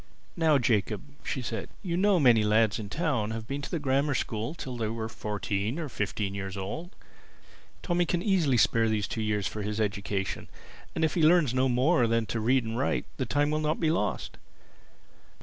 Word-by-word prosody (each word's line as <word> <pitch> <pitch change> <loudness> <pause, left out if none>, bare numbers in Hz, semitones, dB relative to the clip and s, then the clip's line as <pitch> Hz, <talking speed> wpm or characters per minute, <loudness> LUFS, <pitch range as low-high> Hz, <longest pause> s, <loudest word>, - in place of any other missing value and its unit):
"Now 160 -3 +4
Jacob," 110 -5 +1 0.2
she 130 - -3
said, 115 -1 -4
"you 175 -3 -2
know 200 +2 +4
that 175 - +2
many 120 -5 +6
lads 110 0 +3
in 105 - -5
the - - -7
town 145 -11 0
have 110 0 -4
been 140 +4 -4
to 140 - -6
the 170 - -1
Grammar 140 0 +1
School 115 +7 -2
till 130 -6 -6
they 115 -2 -2
were 110 0 -3
fourteen 105 +2 -3
or 160 -4 -4
fifteen 105 -3 -2
years 95 -1 -5
old. 160 - -5 0.9
Tommy 175 -1 +1
can 175 0 0
easily 175 - +3
spare 115 0 +3
these 105 -2 0
two 110 - -3
years 105 -2 0
for 105 - -3
his 105 +1 -3
education; 100 -2 -2 0.5
and 160 - +2
if 155 - -1
he 170 - 0
learns 155 -5 +5
no 130 +1 +2
more 125 +2 +3
than 115 0 +1
to 115 +2 -3
read 125 +3 +2
and 115 +1 -3
write, 135 - 0
the 130 - -2
time 145 +1 +1
will 155 - +1
not 155 0 0
be 160 -2 +2
lost. 165 - -2
120 Hz, 205 wpm, -28 LUFS, 105-155 Hz, 0.9 s, many